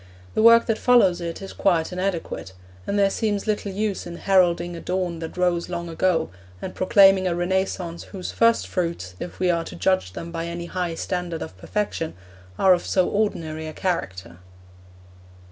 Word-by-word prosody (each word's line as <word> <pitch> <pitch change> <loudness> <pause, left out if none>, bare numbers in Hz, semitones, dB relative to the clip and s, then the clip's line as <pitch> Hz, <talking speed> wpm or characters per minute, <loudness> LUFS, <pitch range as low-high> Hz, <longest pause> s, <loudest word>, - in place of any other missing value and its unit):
The - - +1
work 230 +1 +7
that 225 -2 0
follows 195 -8 +4
it 170 +2 -5
is 195 - -8
quite 175 -3 +1
inadequate, 180 - -3 0.3
and 205 - 0
there 200 -1 +3
seems 205 -2 -1
little 210 -2 -1
use 205 -1 -2
in 170 - -7
heralding 175 -3 +2
a 170 - -7
dawn 180 -2 -2
that 160 +2 -7
rose 180 -1 +1
long 170 -1 -4
ago, 165 -1 +1 0.3
and - - -6
proclaiming 195 0 +5
a 175 - 0
Renaissance 175 -1 -2
whose 190 -3 -6
first 230 0 +3
fruits, 170 - -3
if 175 - -7
we 180 -1 +3
are 170 -1 0
to - - -9
judge 185 - 0
them 170 +11 -7
by 165 0 -4
any 170 0 -5
high 175 -1 -3
standard 175 -1 -3
of - - -9
perfection, 165 - -3 0.4
are 190 -1 +6
of 175 - 0
so 185 -2 +2
ordinary 160 -7 -2
a 155 - -6
character. 95 - -3
180 Hz, 180 wpm, -23 LUFS, 170-195 Hz, 0.4 s, work